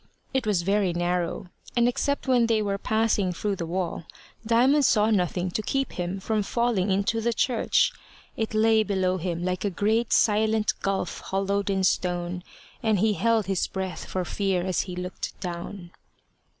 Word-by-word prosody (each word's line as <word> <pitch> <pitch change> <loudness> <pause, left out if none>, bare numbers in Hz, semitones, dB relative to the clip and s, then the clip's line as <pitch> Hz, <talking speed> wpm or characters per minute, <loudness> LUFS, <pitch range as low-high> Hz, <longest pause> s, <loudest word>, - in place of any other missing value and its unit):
It 260 -4 0
was 190 -5 +1
very 195 -1 +1
narrow, 175 +1 -2 0.3
and 240 0 +4
except 280 +3 -1
when 245 -3 +4
they 225 -1 +2
were 200 -1 -2
passing 220 -4 +1
through 200 +3 -2
the 170 -2 -4
wall, 175 -1 -3 0.4
Diamond 250 +6 +4
saw 220 -4 +4
nothing 180 -2 0
to 215 - -1
keep 270 +5 -1
him 180 +2 -3
from 215 +2 0
falling 215 -2 0
into 200 +4 +1
the 235 +1 +1
church. 240 0 +2 0.4
It 220 -1 -3
lay 220 0 +4
below 190 -3 0
him 175 -1 -3
like 185 0 -2
a 205 - +1
great 215 +5 0
silent 215 0 +3
gulf 195 -1 -2
hollowed 200 +1 -1
in 190 -1 +1
stone, 180 -1 0 0.4
and 220 -3 +2
he 215 +3 +2
held 225 +1 +2
his 190 -1 0
breath 190 -1 -5
for 185 -1 -3
fear 190 -1 0
as 185 -1 +1
he 180 - -5
looked 180 +1 -6
down. 175 0 -6
200 Hz, 170 wpm, -26 LUFS, 180-220 Hz, 0.4 s, and